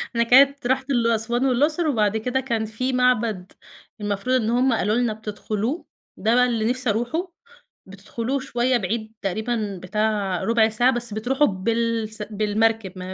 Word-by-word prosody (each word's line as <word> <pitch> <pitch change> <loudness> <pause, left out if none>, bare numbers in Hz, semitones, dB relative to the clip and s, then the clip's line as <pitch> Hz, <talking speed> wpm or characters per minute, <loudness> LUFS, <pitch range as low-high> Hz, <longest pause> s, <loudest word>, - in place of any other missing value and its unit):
أنا 235 - +3
كانت 270 +2 +5
رُحت 265 +1 0
ال 240 -4 +2
أسوان 235 +3 0
والأقصر، 295 +6 +1
وبعد 220 -6 +1
كده 250 +4 -1
كان 235 -4 -2
في 255 +5 -3
معبد 230 -7 +1 0.5
المفروض 205 +5 -1
إن 225 -4 +1
هُم 250 +2 +2
قالوا 215 -1 +1
لنا 240 -2 +1
بتدخلوه، 215 - -4 0.3
ده 220 +4 +1
بقى 250 0 +5
اللي 230 -2 0
نفسي 250 -1 -1
أروحه، 245 - -2 0.5
بتدخلوه 225 +7 -4
شوية 255 -1 0
بعيد 220 +2 -3
تقريبًا 210 0 -2
بتاع 205 -2 -1
رُبع 225 -1 +3
ساعة 240 +4 +3
بس 240 -3 -2
بتروحوا 265 +7 +1
بالس 225 +2 -2
بالمركب، 215 -1 0
ما 185 +1 -6
230 Hz, 155 wpm, -23 LUFS, 215-250 Hz, 0.5 s, كانت